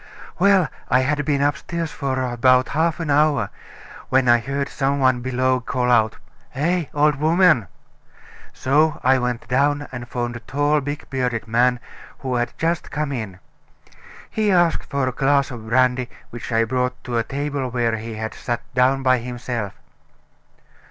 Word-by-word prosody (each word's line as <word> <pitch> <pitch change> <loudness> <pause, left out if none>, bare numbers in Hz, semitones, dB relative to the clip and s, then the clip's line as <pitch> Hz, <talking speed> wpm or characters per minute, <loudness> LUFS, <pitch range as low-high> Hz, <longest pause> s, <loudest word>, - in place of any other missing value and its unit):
"Well, 190 -3 +4 0.2
I 125 - +4
had 145 +3 0
been 140 -1 +1
upstairs 155 +3 -2
about 130 -1 +2
half 165 +3 0
an 165 -3 -2
hour, 150 0 +2 0.6
when 130 -1 +3
I 120 0 +6
heard 140 +4 -3
some 140 0 -1
one 130 -2 +3
below 130 0 +1
call 125 -1 -1
out: 110 -2 +3 0.4
'Eh! 170 +5 0
old 150 0 +2
woman!' 160 - +3 0.8
So 150 +3 +1
I 130 +1 +4
went 125 -1 -3
down, 145 +3 +1
and 120 -1 -7
found 120 -1 -3
a - - -5
tall, 145 +4 0
big 145 +2 -5
bearded 125 -4 -2
man, 120 +2 +2 0.4
who 130 -2 -4
had 120 -1 -2
just 165 +1 -1
come 150 -1 -2
in. 110 -8 -5 0.9
He 215 -2 0
asked 175 -2 +2
for 140 -2 0
a - - 0
glass 140 +1 +1
of 115 -3 -8
brandy, 125 0 +2 0.2
which 120 +1 -7
I 115 0 +3
brought 125 +2 -2
to 120 -2 -1
a - - +1
table 140 0 -3
where 120 -2 0
he 110 0 -6
had 110 +1 -4
sat 120 -1 -3
down 130 +1 +2
by 130 -1 +4
himself." 120 -3 -4
130 Hz, 160 wpm, -21 LUFS, 120-145 Hz, 0.9 s, I